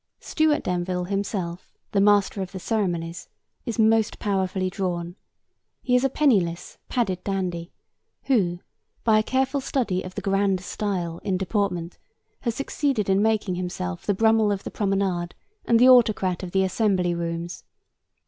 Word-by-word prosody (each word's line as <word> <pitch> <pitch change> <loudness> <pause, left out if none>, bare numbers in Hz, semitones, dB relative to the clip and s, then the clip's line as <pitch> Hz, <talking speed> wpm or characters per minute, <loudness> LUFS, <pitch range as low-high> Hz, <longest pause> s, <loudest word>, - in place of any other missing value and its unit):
Stuart 310 -2 +1
Denville 180 0 -1
himself, 190 -2 -3 0.2
the 200 - +2
Master 205 -1 +3
of 190 0 -6
the 190 - -5
Ceremonies, 175 -6 -2 0.4
is 230 - -3
most 220 -1 +3
powerfully 190 -2 -1
drawn. 175 -2 -3 0.7
He 250 - +2
is 250 - +3
a 270 - +3
penniless, 200 - +1
padded 190 -7 -1
dandy 180 -3 -3 0.5
who, 180 -10 +1 0.4
by 220 -2 +4
a - - +1
careful 265 +3 0
study 220 -9 -1
of 185 0 -9
the 205 - -3
'grand 195 -1 +1
style' 180 -4 -3
in 190 -2 -1
deportment, 185 -3 -2 0.4
has 235 -3 -2
succeeded 275 -6 -1
in 190 +1 +3
making 215 -3 +1
himself 175 - -4
the 205 - +2
Brummel 220 0 +3
of 200 -1 -2
the - - -6
promenade 195 -4 -1 0.3
and 230 - +4
the 250 +2 +6
autocrat 215 -8 +4
of 185 - -5
the 190 +2 +2
Assembly 185 -2 +1
Rooms. 170 0 -4
195 Hz, 150 wpm, -24 LUFS, 180-220 Hz, 0.7 s, the